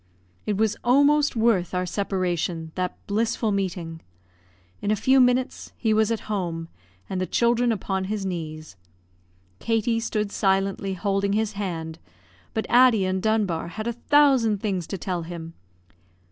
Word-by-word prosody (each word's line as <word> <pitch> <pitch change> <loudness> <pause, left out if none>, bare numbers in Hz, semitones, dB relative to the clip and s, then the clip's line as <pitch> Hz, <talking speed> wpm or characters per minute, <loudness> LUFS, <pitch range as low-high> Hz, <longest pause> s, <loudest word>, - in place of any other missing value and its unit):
It 210 -2 0
was 215 0 +2
almost 285 +3 +4
worth 220 -6 +2
our 180 0 0
separation, 180 -4 -2
that 180 -1 -3
blissful 220 +1 0
meeting. 175 -4 -3 0.8
In 205 - -2
a 215 - +3
few 260 +6 +3
minutes 250 0 +1
he 220 -2 +1
was 220 0 +3
at 230 -1 -1
home, 170 -6 -3 0.4
and 185 -1 -3
the 185 - -1
children 235 0 +2
upon 190 -2 -2
his 205 0 -3
knees. 155 - -5 0.8
Katie 225 0 +1
stood 215 -2 -2
silently 195 -1 0
holding 195 +2 0
his 215 0 0
hand, 165 -6 -5 0.6
but 220 - -1
Addie 240 -5 +5
and 185 0 -1
Dunbar 205 -7 0
had 215 +5 -6
a 235 - -1
thousand 260 -4 +3
things 190 -5 -2
to 195 - -4
tell 180 -1 -3
him. 165 -1 -7
200 Hz, 145 wpm, -24 LUFS, 180-225 Hz, 0.8 s, Addie